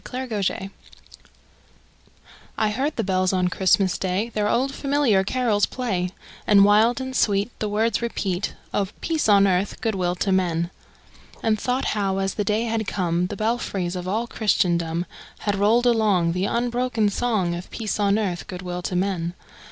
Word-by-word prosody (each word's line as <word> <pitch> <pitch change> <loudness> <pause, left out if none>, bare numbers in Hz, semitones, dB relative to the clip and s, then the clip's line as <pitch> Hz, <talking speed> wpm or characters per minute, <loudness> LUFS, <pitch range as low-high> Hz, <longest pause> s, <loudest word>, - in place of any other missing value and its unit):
CHRISTMAS 240 -7 -2
BELLS - - -3 2.0
I 215 - +2
heard 275 +7 -1
the - - -1
bells 185 -1 +1
on 180 -1 +1
Christmas 190 0 +2
Day 190 +5 -1
Their 210 -2 -1
old, 270 +3 +1
familiar 275 -9 +2
carols 215 -2 +1
play, 195 -8 -2 0.4
And 200 -1 +7
wild 220 +5 +4
and 260 0 -5
sweet 205 0 +1
The 215 - -1
words 220 +2 +1
repeat 200 -5 -2 0.2
Of 200 -1 -2
peace 320 -8 0
on 200 -1 +6
earth, 190 +1 0
good 225 - -1
will 180 -2 -1
to 195 +2 -1
men! 175 -2 +1 0.7
And 220 -2 +2
thought 250 +4 -1
how, 195 -2 0
as 195 0 -1
the 210 - -1
day 215 +2 0
had 225 -2 -2
come, 175 -2 0
The 205 - -6
belfries 205 -5 -1
of 180 0 -5
all 220 +5 0
Christendom 175 -7 0 0.4
Had 205 -1 0
rolled 220 +5 +3
along 210 -8 +3
The 180 +3 -1
unbroken 240 -1 0
song 205 -6 0
Of 175 +1 -6
peace 215 -2 -3
on 200 0 +3
earth, 190 -5 -2
good 180 0 -7
will 180 0 -4
to 180 - -3
men! 180 -2 -1
205 Hz, 170 wpm, -23 LUFS, 185-230 Hz, 2.0 s, And